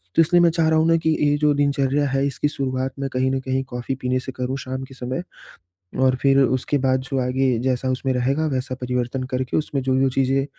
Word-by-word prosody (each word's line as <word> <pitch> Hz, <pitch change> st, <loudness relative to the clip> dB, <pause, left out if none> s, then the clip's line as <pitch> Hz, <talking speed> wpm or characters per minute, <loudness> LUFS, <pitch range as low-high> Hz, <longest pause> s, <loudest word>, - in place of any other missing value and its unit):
तो -, -, +6 dB
इसलिए 175 Hz, +2 st, +4 dB
मैं 170 Hz, -, +5 dB
चाह 165 Hz, -1 st, +1 dB
रहा 160 Hz, 0 st, +3 dB
हूँ 160 Hz, -, +2 dB
ना 165 Hz, -, +4 dB
की -, -, +4 dB, 0.2 s
ये 145 Hz, -, +2 dB
जो 150 Hz, 0 st, +3 dB
दिनचर्या 140 Hz, 0 st, +1 dB
है 135 Hz, +1 st, +1 dB
इसकी 140 Hz, +1 st, -1 dB
शुरुआत 130 Hz, -2 st, -2 dB
में 135 Hz, 0 st, -2 dB
कहीं 130 Hz, +1 st, +1 dB
न 135 Hz, -, 0 dB
कहीं 130 Hz, 0 st, -2 dB
कॉफ़ी 125 Hz, +2 st, -4 dB
पीने 130 Hz, 0 st, 0 dB
से 130 Hz, +1 st, -7 dB
करूँ 130 Hz, +1 st, -3 dB
शाम 130 Hz, 0 st, -5 dB
के 135 Hz, -, -11 dB
समय 130 Hz, +6 st, -4 dB, 0.8 s
और 130 Hz, 0 st, +4 dB
फिर 135 Hz, 0 st, +4 dB
उसके 130 Hz, +2 st, +1 dB
बाद 130 Hz, -1 st, +1 dB
जो 135 Hz, 0 st, -3 dB
आगे, 130 Hz, -1 st, +1 dB
जैसा 130 Hz, 0 st, -1 dB
उसमें 130 Hz, +1 st, -1 dB
रहेगा 135 Hz, +5 st, 0 dB
वैसा 130 Hz, 0 st, -2 dB
परिवर्तन 125 Hz, +1 st, -2 dB
करके 130 Hz, 0 st, -1 dB
उसमें 145 Hz, -3 st, -1 dB
जो-जो 130 Hz, +1 st, +2 dB
चीज़ें 135 Hz, +1 st, +1 dB
130 Hz, 225 wpm, -22 LUFS, 130-140 Hz, 0.8 s, तो